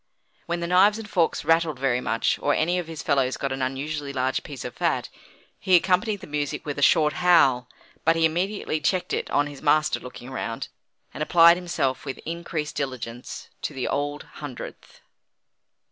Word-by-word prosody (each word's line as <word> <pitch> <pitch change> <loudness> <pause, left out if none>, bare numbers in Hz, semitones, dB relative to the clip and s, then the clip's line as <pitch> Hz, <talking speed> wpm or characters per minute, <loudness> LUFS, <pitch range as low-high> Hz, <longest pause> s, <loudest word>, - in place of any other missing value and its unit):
When 170 0 -2
the - - -1
knives 195 +4 +5
and 225 -1 -7
forks 175 -6 0
rattled 165 -3 +2
very 130 -2 +1
much, 115 - 0
or 145 - +2
any 175 +3 +1
of 175 - -5
his 165 -2 -7
fellows 135 -2 +1
got 135 - -2
an 135 0 -3
unusually 140 +2 -3
large 130 -1 0
piece 140 -4 -8
of - - -5
fat, - - 0 0.5
he 185 - +4
accompanied 190 +3 +2
the - - -8
music 150 0 -3
with 145 -1 -4
a - - -3
short 150 0 +4
howl, 135 -9 +4 0.3
but 165 +1 +4
he 165 0 +3
immediately 175 0 -1
checked 180 +4 0
it - - -2
on 145 - +2
his 145 -1 -9
master 155 0 +3
looking 125 0 -10
round, 115 -3 -4 0.4
and - - -7
applied 170 +2 +7
himself 140 -7 -1
with 135 -2 -5
increased 165 -2 -4
diligence 125 -3 -5
to 145 - -4
the 130 - -2
Old 145 +1 -2
Hundredth. 145 -5 -10
150 Hz, 180 wpm, -25 LUFS, 135-170 Hz, 0.5 s, applied